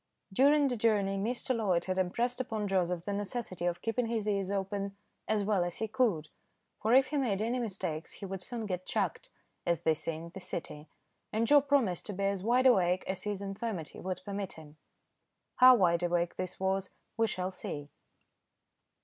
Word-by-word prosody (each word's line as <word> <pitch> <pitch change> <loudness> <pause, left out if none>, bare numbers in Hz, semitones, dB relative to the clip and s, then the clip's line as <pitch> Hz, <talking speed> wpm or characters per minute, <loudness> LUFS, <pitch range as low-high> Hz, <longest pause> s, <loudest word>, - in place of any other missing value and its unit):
During 285 +5 +5
the 250 -2 -1
journey, 210 -3 +2
Mr. 245 +4 -1
Loyd 195 -7 +1
had 185 0 -1
impressed 235 +8 0
upon 220 -4 -3
Joseph 180 -3 0
the 205 - -2
necessity 200 -3 -3
of 175 0 -2
keeping 230 +1 0
his 225 -2 -1
ears 200 -2 0
open 200 0 -2 0.3
as 215 -1 +1
well 200 -3 +2
as 175 -1 -4
he 220 - -1
could, 210 - +1 0.5
for 220 +3 +4
if 265 0 +5
he 295 - -1
made 230 -8 +1
any 235 +4 0
mistakes 185 -8 -4
he 200 - -7
would 190 -1 -5
soon 230 +4 -5
get 185 -2 -4
"chucked," - - -1 0.3
as 170 -2 0
they 160 - +3
say 155 +1 -4
in 165 +2 -8
the 190 - -7
City, 155 -4 -6 0.4
and 220 +2 +1
Joe 290 +4 +7
promised 270 - +1
to 210 - -3
be 200 +1 -3
as 195 -1 0
wideawake 220 -6 +4
as 190 0 -4
his 205 -1 -2
infirmity 195 -4 -4
would 185 -1 -4
permit 200 -1 -4
him. 155 -2 -13 0.8
How 255 -1 +9
wideawake 175 -2 +2
this 185 -1 -5
was, 190 0 0 0.3
we 225 0 +2
shall 185 -2 -3
see. 145 -5 -6
195 Hz, 185 wpm, -31 LUFS, 180-230 Hz, 0.8 s, How